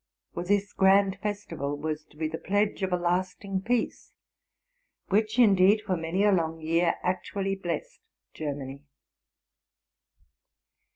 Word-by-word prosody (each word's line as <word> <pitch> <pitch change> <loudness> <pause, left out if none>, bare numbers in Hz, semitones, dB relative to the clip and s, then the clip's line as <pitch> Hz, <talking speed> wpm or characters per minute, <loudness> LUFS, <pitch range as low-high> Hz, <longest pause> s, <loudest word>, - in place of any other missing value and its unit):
For 175 - -3
this 200 +2 0
grand 195 0 +4
festival 170 -9 -3
was 155 0 -3
to 150 - -23
be 155 0 -1
the 160 +1 -5
pledge 205 +1 0
of 190 -1 -1
a 180 - +2
lasting 185 +2 -1
peace, 240 +3 -2 1.0
which 215 +3 +1
indeed 205 -2 +5
for 190 -3 0
many 165 +4 -1
a 205 - +5
long 165 -3 0
year 165 +2 +1
actually 190 +2 -1
blessed 195 - -4 0.3
Germany. 140 -2 -5
185 Hz, 125 wpm, -27 LUFS, 165-205 Hz, 1.0 s, indeed